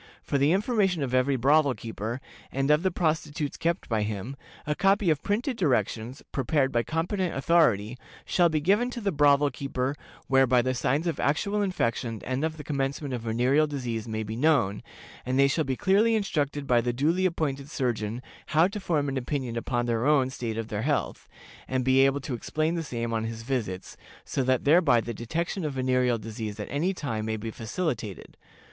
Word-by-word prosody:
For 140 - 0
the 140 +3 +4
information 195 - +1
of 130 -2 -3
every 130 +2 +3
brothel 140 +2 +3
keeper, 115 +2 -5 0.3
and 135 +2 +1
of 150 +1 +4
the 190 - +2
prostitutes 155 -4 -1
kept 170 +2 -1
by 110 -2 0
him, 105 +5 -4 0.3
a 150 - 0
copy 195 +1 +3
of 150 -2 0
printed 230 +5 -1
directions, 130 - -1
prepared 135 0 +1
by 120 - +2
competent 170 - -2
authority, 130 -7 +2 0.3
shall 175 -2 +3
be 155 -1 +1
given 205 +9 +2
to 245 - -5
the 205 -3 -1
brothel 145 -2 +4
keeper, 135 +1 -2 0.3
whereby 130 -2 +4
the 130 +1 0
signs 140 +5 0
of 170 - -2
actual 200 +9 +1
infection 115 - -1
and 130 +3 -2
of 160 0 -2
the 150 - -7
commencement 140 -1 -2
of 120 - -3
venereal 125 +7 +2
disease 120 -6 -4
may 110 0 -3
be 110 +1 -5
known, 120 -7 +2 0.4
and 130 +1 -1
they 140 0 +6
shall 155 +3 +1
be 130 - -1
clearly 205 - +3
instructed 150 -9 -1
by 120 -3 +3
the 120 +1 -1
duly 165 +9 +2
appointed 145 -5 -3
surgeon 120 -5 -2 0.3
how 165 +3 +7
to 200 +2 -5
form 155 -7 0
an 135 -1 -2
opinion 130 -2 -3
upon 120 +1 -1
their 120 +2 0
own 135 -4 +3
state 115 -4 -4
of 115 0 -4
health, 125 +8 -2 0.4
and 130 -1 -1
be 130 0 +4
able 135 +1 +4
to 135 -1 -5
explain 155 +7 -1
the 170 - -1
same 120 -6 -3
on 110 0 -1
his 115 0 -5
visits, 115 -8 -3 0.3
so - - -1
that 130 -1 +1
thereby 145 -5 +5
the 120 +1 -4
detection 165 - -3
of 150 -2 -2
venereal 125 -2 +1
disease 110 -1 -6
at 105 - -4
any 160 +7 +1
time 125 - -3
may 110 0 -2
be 110 +1 -5
facilitated. 115 - -4
135 Hz, 190 wpm, -27 LUFS, 120-160 Hz, 0.4 s, how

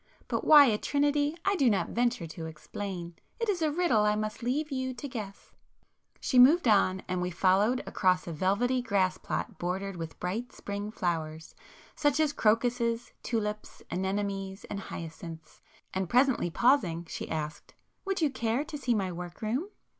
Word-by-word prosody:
But - - -1
why 295 -2 +9
a 215 -5 +2
trinity 290 +2 +1
I 395 - +3
do 275 -9 +4
not 200 -3 +1
venture 240 -6 0
to 160 0 -7
explain!—it 175 - -6
is 385 -5 0
a 315 - +3
riddle 310 -8 +2
I 210 0 +3
must 215 0 -3
leave 285 +6 -1
you 260 -1 -2
to 285 - -6
guess!" 215 -7 -7 0.7
She 255 - +2
moved 280 +4 +7
on, 190 -3 +3
and 180 0 -1
we 180 - -1
followed 195 +7 +2
across 185 -2 +1
a 170 - -5
velvety 210 +10 +1
grass 195 -6 +1
plot - - -4
bordered 190 +2 -2
with 165 -1 -7
bright 210 +8 -3
spring 205 +1 -5
flowers, 160 -5 -3 0.4
such 290 0 +2
as 305 -2 +2
crocuses, 235 +1 +1
tulips, 210 -2 -3
anemones, 195 0 -2
and 200 - -3
hyacinths, 165 -2 -8 0.3
and 190 -2 -2
presently 250 -5 +3
pausing 180 - +2
she - - -6
asked—"Would 160 - -5
you 305 -3 +3
care 235 +1 0
to 305 -2 -7
see 245 -4 +1
my 190 -3 -1
work 175 +3 -8
room?" 250 - -1
210 Hz, 160 wpm, -29 LUFS, 185-260 Hz, 0.7 s, why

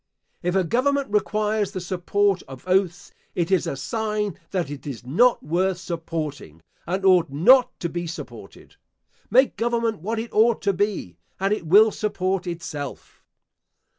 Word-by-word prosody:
If 180 +1 -1
a 190 - +3
government 270 - 0
requires 210 0 0
the 185 - -3
support 185 +2 0
of 135 +5 -11
oaths, 185 -1 0 0.2
it 175 +1 -1
is 185 -3 +2
a - - -2
sign 210 - -2
that 175 -7 -2
it 145 0 -8
is 125 -4 -7
not 235 - +3
worth 180 +4 0
supporting, 160 - -5 0.2
and 190 +3 -2
ought 180 -5 +5
not 245 - +4
to 170 - 0
be 175 +1 -4
supported. 130 - -10 0.5
Make 260 +5 +4
government 230 -2 0
what 220 +6 -3
it 225 +1 -5
ought 225 +1 +3
to 200 - +2
be, 185 - -2 0.2
and 195 +2 +1
it 170 -6 -4
will 210 +6 +6
support 195 -3 -2
itself. 165 -5 -7
190 Hz, 155 wpm, -23 LUFS, 165-215 Hz, 0.5 s, will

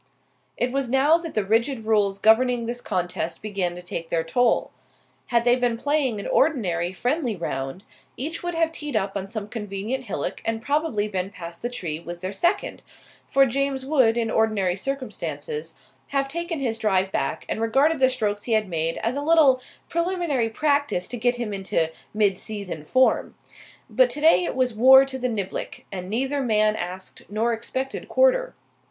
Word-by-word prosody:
It 245 +1 0
was 270 -2 -1
now 275 +6 +4
that 335 -2 -7
the 215 -2 +1
rigid 225 +3 +1
rules 205 -3 +2
governing 235 +3 +4
this 240 +1 -4
contest 175 -4 -2
began 195 -5 -2
to 180 - -9
take 170 -2 -5
their 165 -1 0
toll. 230 +9 +1 0.6
Had 235 -1 +2
they 245 0 +5
been 245 -2 0
playing 280 -4 0
an - - -6
ordinary 185 - +1
friendly 245 - -1
round, 135 0 -4 0.3
each 315 +6 -4
would 350 -1 -3
have 330 -1 +2
teed 295 -5 -5
up 195 -2 0
on 195 -1 -4
some 215 -1 -4
convenient 215 +4 -4
hillock 185 -9 -4
and 225 0 -1
probably 255 -4 0
been 190 -2 -3
past 170 -3 -9
the 240 - -2
tree 170 -10 -4
with 175 +1 -8
their 185 +2 -4
second, 345 - 0 0.5
for 275 0 +5
James 270 +1 -1
would, 260 -6 +3
in 225 -1 0
ordinary 210 -5 +1
circumstances, 275 - -5 0.3
have 275 -1 0
taken 340 +3 -3
his 230 -4 -2
drive 190 -3 +1
back - - -2
and - - -3
regarded 275 +7 +3
the 260 -1 +5
strokes 210 -5 -2
he 235 - 0
had 215 -2 +2
made 165 -1 -1
as 230 +3 0
a 285 - -2
little 290 -4 +5 0.3
preliminary 340 -8 0
practice 285 -6 0
to - - -6
get 245 +1 +1
him 235 -4 -4
into 185 -4 -1 0.2
midseason 200 -5 -1
form. 260 0 +2 0.5
But - - +3
today 320 +4 +4
it - - -3
was 255 -2 +1
war 265 +4 +8
to 265 -1 -6
the 250 0 -1
niblick, 200 -4 -4
and 185 -1 -6
neither 270 +6 0
man 215 -3 +2
asked 185 -1 -6
nor 225 +3 0
expected 260 +4 -4
quarter. - - +3
230 Hz, 175 wpm, -24 LUFS, 200-275 Hz, 0.6 s, war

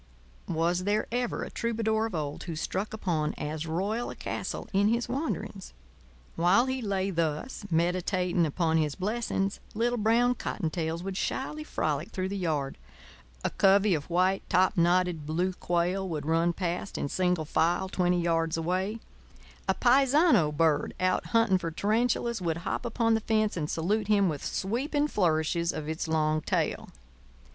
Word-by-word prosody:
Was 175 +3 0
there 210 +1 +1
ever 245 0 -1
a - - -7
troubadour 220 -1 0
of 210 - -6
old 150 -2 -4
who 170 -2 -4
struck 190 +6 -3
upon 170 -8 -1
as 155 +2 -4
royal 200 +9 -1
a - - -7
castle - - -4
in 200 +1 +4
his 235 +2 +1
wanderings? 235 - -4 0.6
While 180 +8 +4
he 260 0 -2
lay 195 -3 -1
thus, 165 - -2
meditating 175 +1 +1
upon 160 +1 +1
his 150 -3 0
blessings, 200 -1 -1 0.2
little 240 +2 +1
brown 235 +3 +3
cottontails 165 -6 -3
would 190 0 -4
shyly 300 +8 -2
frolic 155 - -2
through 185 0 -3
the 200 - -3
yard; 150 -7 -2 0.7
a - - +1
covey 195 +1 +4
of 150 -1 -3
white 185 +2 +2
topknotted 180 -3 +2
blue 175 +4 0
quail 180 +2 -1
would 150 -3 -3
run 165 +2 +2
past, 175 +2 -3
in - - -1
single 180 0 0
file, 170 +5 +1
twenty 180 -1 +1
yards 165 -1 +1
away; 185 +6 -1 0.7
a - - +3
paisano 270 - +4
bird, 150 -1 +1
out 185 0 +1
hunting 225 -5 +3
for 170 - -3
tarantulas, 225 +4 0
would 165 -2 -1
hop - - -2
upon 230 -1 +1
the 220 - +1
fence 215 -1 +1
and 155 -3 -2
salute 200 +6 0
him 200 -3 +4
with 150 -3 -4
sweeping 275 +9 -1
flourishes 170 - +1
of 155 -1 -5
its 160 +1 -3
long 155 -1 +1
tail. - - -1
185 Hz, 155 wpm, -28 LUFS, 165-215 Hz, 0.7 s, in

